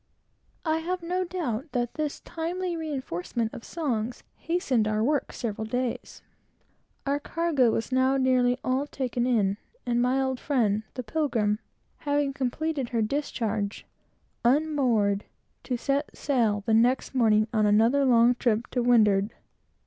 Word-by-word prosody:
I 320 0 +1
have 355 +2 -3
no 365 +2 -1
doubt 315 -7 -4
that 240 -2 -1
this 300 -2 -3
timely 345 +2 -3
reinforcement 260 - -3
of 230 - -8
songs 245 -8 -3
hastened 270 -10 0
our 215 0 +1
work 285 +3 0
several 220 -2 -4
days. 245 +2 -3 0.8
Our 285 +1 +1
cargo 305 -5 +1
was 225 +3 -2
now 260 +1 +3
nearly 255 -1 +3
all 265 +3 0
taken 250 -3 -2
in; 205 -5 +2 0.3
and 240 0 +1
my 250 +2 +2
old 265 -1 -1
friend, 220 -7 +1
the 255 - -4
Pilgrim, 225 -6 0 0.4
having 285 -1 0
completed 275 +1 -2
her 230 -2 0
discharge, 220 -5 -2 0.6
unmoored, 245 -7 +2 0.4
to 250 - -1
set 275 +4 -2
sail 225 -7 +1
the 225 - +1
next 245 +5 +3
morning 215 -4 +3
on 215 -2 +3
another 225 +7 +4
long 240 -2 +5
trip 235 -2 0
to 250 - 0
windward. 215 -4 +3
250 Hz, 140 wpm, -27 LUFS, 225-285 Hz, 0.8 s, long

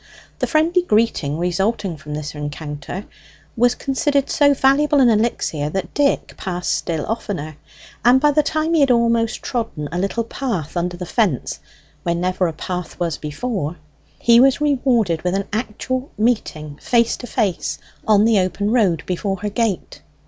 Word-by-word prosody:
The - - 0
friendly 335 +3 +3
greeting 215 - +1
resulting 180 +2 -1
from 150 0 -7
this 150 0 -5
rencounter 150 +5 -6 0.5
was 245 +1 +3
considered 280 0 0
so 285 -1 +4
valuable 280 +2 +3
an 255 -3 +6
elixir 210 -9 0
that 190 +3 -4
Dick 285 -1 +1
passed 180 -1 -2
still 160 -3 -2
oftener; 190 -9 -4 0.5
and 245 +3 +6
by 295 +2 +4
the 305 +1 +4
time 310 +2 -1
he 325 - +4
had 280 -2 +4
almost 235 -1 +2
trodden 225 - -3
a 175 - -2
little 200 +5 -1
path 220 - -4
under 175 0 -2
the 180 - -5
fence 210 +3 0 0.4
where 170 -2 0
never 180 +1 0
a 165 - -3
path 180 +1 -5
was 170 -3 -1
before, 160 +1 -3 0.4
he 235 0 +5
was 265 +1 +5
rewarded 245 - +1
with 180 +1 -1
an 200 0 -2
actual 255 +4 -3
meeting 155 -10 -1
face 235 -1 +2
to 245 - -8
face 215 -6 -1 0.3
on 210 -1 +5
the 225 -3 +4
open 190 +3 0
road 195 -10 +2
before 195 +1 -2
her 210 - -1
gate. 210 -3 -2
210 Hz, 165 wpm, -20 LUFS, 175-245 Hz, 0.5 s, an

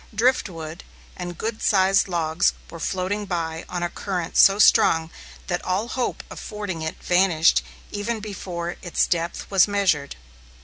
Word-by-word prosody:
Driftwood 180 -9 0 0.3
and 175 -1 -6
good 220 0 -4
sized 195 -1 +3
logs 165 -2 +1 0.2
were 165 - -8
floating 195 +4 -2
by 165 -3 -3
on 175 -1 -3
a 175 - 0
current 180 -4 -4
so 195 0 +7
strong 160 -5 +5 0.3
that 175 -1 -2
all 195 +6 -1
hope 250 -1 -2
of - - -8
fording 205 -6 -5
it 160 0 -3
vanished 175 -3 +4 0.3
even 215 +3 -2
before 180 -4 -5
its 175 - +1
depth 170 -1 -2
was 195 -1 +5
measured. 190 -9 0
180 Hz, 145 wpm, -23 LUFS, 170-205 Hz, 0.3 s, so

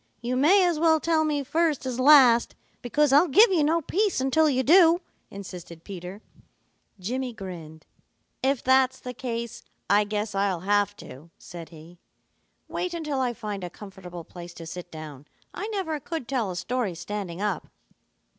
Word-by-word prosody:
You 245 +2 -3
may 360 +9 +5
as 340 -3 0
well 320 -1 +4
tell 320 0 +1
me 295 -2 -1
first 315 -1 0
as 255 -1 -3
last, 255 -4 +6 0.3
because 285 +3 +1
I'll 300 +6 +6
give 415 - +6
you 335 -5 +3
no 325 +3 +2
peace 400 +2 0
until 285 +4 +3
you 260 -2 +1
do," 335 +3 +6 0.3
insisted 180 -4 -10
Peter. 190 +2 -9 0.8
Jimmy 250 +6 -3
grinned. 170 -7 -9 0.6
"If 270 0 0
that's 260 0 +3
the 250 - -7
case, 235 -2 -5 0.3
I 205 +1 +4
guess 210 0 -3
I'll 195 -3 0
have 205 +1 +1
to," 140 +2 -12
said 170 -2 -10
he. 165 +1 -15 0.7
"Wait 360 -1 -3
until 300 -5 -3
I 250 -2 0
find 210 -4 -5
a 180 - -4
comfortable 180 -3 -10
place 175 +1 -11
to 165 - -9
sit 175 +2 -8
down. 150 -3 -10 0.3
I 410 - -5
never 375 -8 -3
could 320 -4 -6
tell 245 -7 -1
a 180 - -5
story 205 +1 -2
standing 180 0 -6
up." 210 0 -2
240 Hz, 165 wpm, -26 LUFS, 185-300 Hz, 0.8 s, last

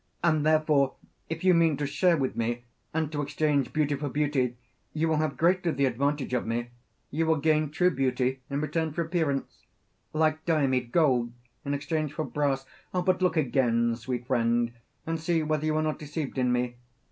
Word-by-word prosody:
And 155 -3 +3
therefore, 155 -3 +3 0.3
if 165 +1 -4
you 185 -1 +6
mean 165 -4 +3
to 145 - -1
share 160 +5 +2
with 135 -3 -1
me 120 +1 -2 0.3
and 160 -1 -1
to 145 -1 -2
exchange 145 -1 0
beauty 150 -2 +1
for 145 +1 -3
beauty, 135 -4 0 0.4
you 160 +1 +1
will 160 -1 +2
have 155 -2 -1
greatly 175 +1 +2
the 140 0 +2
advantage 135 +2 -1
of 125 - 0
me; 120 +1 -2 0.4
you 160 +3 0
will 160 - +4
gain 155 0 +2
true 180 +4 +2
beauty 130 -2 0
in 140 +1 -1
return 155 +1 -1
for 170 - 0
appearance 160 -5 -2 0.4
like 155 0 +1
Diomede, 135 -7 +1
gold 125 -7 +2 0.3
in 140 0 -1
exchange 145 +1 -2
for 155 0 -2
brass. 140 -2 -1 0.3
But 185 0 +1
look 180 -3 +2
again, 120 -4 +2
sweet 120 +1 -4
friend, 120 -1 +1 0.3
and 165 0 -2
see 165 0 +1
whether 155 0 0
you 155 - +1
are 155 - +1
not 155 -1 -1
deceived 145 -2 -4
in 125 -1 +2
me. 125 0 -1
145 Hz, 185 wpm, -28 LUFS, 130-160 Hz, 0.4 s, you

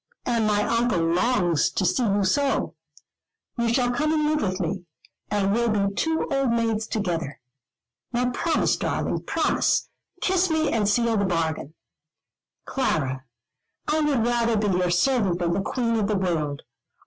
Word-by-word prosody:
And 230 -3 +1
my 210 0 +2
Uncle 235 -2 +1
longs 175 -1 +2
to 190 - -1
see 215 - +1
you 205 -3 +1
so. 280 +8 +1 0.8
You 235 -1 0
shall 245 0 +2
come 300 +5 0
and 310 -1 +1
live 305 -1 +1
with 185 -1 -1
me, 180 +1 -3 0.4
and 200 -1 +1
we'll 235 +1 +1
be 200 -2 0
two 320 +9 -1
old 275 -2 +1
maids 225 -2 0
together. 170 -10 -3 0.7
Now 250 0 0
promise, 325 +6 +1
darling, - - -2
promise. - - +1 0.3
Kiss 375 0 +1
me, 315 -1 +1
and 210 -3 +1
seal 230 +1 +2
the 200 - +1
bargain." 160 -4 -2 0.9
"Clara, 135 - -1 0.6
I 310 - +1
would 285 -7 +1
rather 235 -1 +1
be 205 -3 +1
your 180 0 +1
servant 195 0 +2
than 170 -1 0
the 195 - 0
queen 230 +3 -1
of 210 -2 0
the 210 -1 0
world. 160 -6 -2
215 Hz, 160 wpm, -24 LUFS, 180-245 Hz, 0.9 s, my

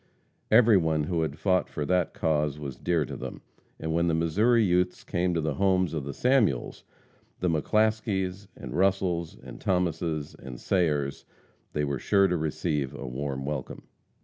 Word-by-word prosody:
Every 110 -2 +6
one 80 -3 +1
who 85 +2 -1
had 75 -2 -2
fought 90 +3 +1
for 75 - -3
that 90 +2 +1
cause 75 -2 0
was 70 -4 -6
dear 85 -4 0
to - - -7
them, - - -7 0.4
and 80 0 -2
when 85 +1 +2
the 80 - +2
Missouri 105 +9 +3
youths 90 -1 +1
came 90 0 0
to 85 - +1
the 80 -1 -1
homes 95 0 +2
of 75 -4 -3
the 70 - -5
Samuels, 120 - +1 0.6
and 90 -2 +1
McClaskeys, 100 +1 0
and 60 - -8
Russels, 95 -3 0
and - - -11
Thomases, 85 -4 -1
and 60 -2 -10
Sayers, 75 -7 0 0.5
they 75 - 0
were 70 -2 -2
sure 100 -1 +3
to 90 - 0
receive 75 -3 -2
a 70 - -7
warm 70 +1 -4
welcome. 70 -3 -5
85 Hz, 170 wpm, -27 LUFS, 75-95 Hz, 0.6 s, Every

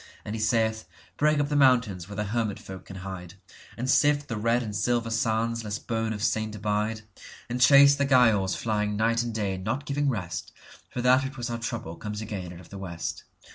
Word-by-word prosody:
And 105 - -4
he 110 - -3
saith, 110 0 +1 0.3
"Break 150 0 +2
up 145 0 0
the 150 - -1
mountains 120 -10 +3
where 100 - -7
the 105 - -1
hermit 105 -1 -1
folk 95 -1 -10
can 95 - -10
hide, 95 -2 -7 0.4
And 125 - -3
sift 145 +1 +3
the 115 - -2
red 115 +3 +1
and 105 -3 -5
silver 120 0 0
sands 115 +1 0
lest 105 -1 -5
bone 115 -1 -1
of 105 -2 -4
saint 110 -1 0
abide, 105 +1 -1 0.5
And 125 +1 -2
chase 140 +2 +8
the 140 0 +1
Giaours 115 -8 +4
flying 105 -2 -1
night 115 +2 +2
and 120 0 -3
day, 100 -4 -2
not 130 +10 -3
giving 145 0 0
rest, 95 -8 -4 0.4
For 125 - -4
that 130 +2 +5
which 135 +1 -6
was 120 -1 -3
our 115 - -3
trouble 115 -8 -5
comes 105 -1 -5
again 100 -5 -5
out 85 - -10
of - - -16
the 100 - -8
west. 85 -3 -5
110 Hz, 215 wpm, -27 LUFS, 105-125 Hz, 0.5 s, chase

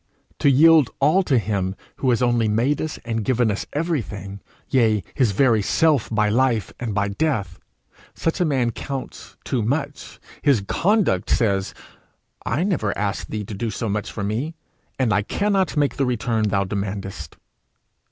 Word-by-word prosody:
To 140 - +4
yield 155 0 +6
all 155 +8 +4
to 140 -8 +2
him 100 -3 -1 0.2
who 130 - 0
has 125 0 +2
only 120 -2 +2
made 120 +7 +1
us 155 - -4
and 115 -2 -2
given 120 -1 +2
us 100 - -4
everything, 110 - -3 0.3
yea 110 -6 +2
his 125 -6 +2
very 115 0 +3
self 150 +3 +2
by 105 -1 +1
life 115 -1 +1
and 115 -5 -3
by 100 -1 +1
death, 100 - -2 0.6
such 165 +4 -1
a - - +4
man 130 -6 +1
counts 135 +3 -7
too 130 -4 -1
much. 140 +5 -3 0.2
His 140 -8 +3
conduct 190 - +1
says, 100 -4 +1 0.7
'I 140 +9 0
never 155 - -1
asked 100 0 -2
thee 110 -1 -3
to 105 - -8
do 110 +4 -3
so 110 +2 -3
much 105 0 -2
for 105 - -5
me, 120 +11 -2 0.4
and 125 -5 +1
I 105 - +3
cannot 195 - 0
make 145 -1 +1
the 140 - +1
return 115 -3 0
thou 100 -1 +1
demandest.' 100 0 -5
115 Hz, 165 wpm, -22 LUFS, 105-140 Hz, 0.7 s, yield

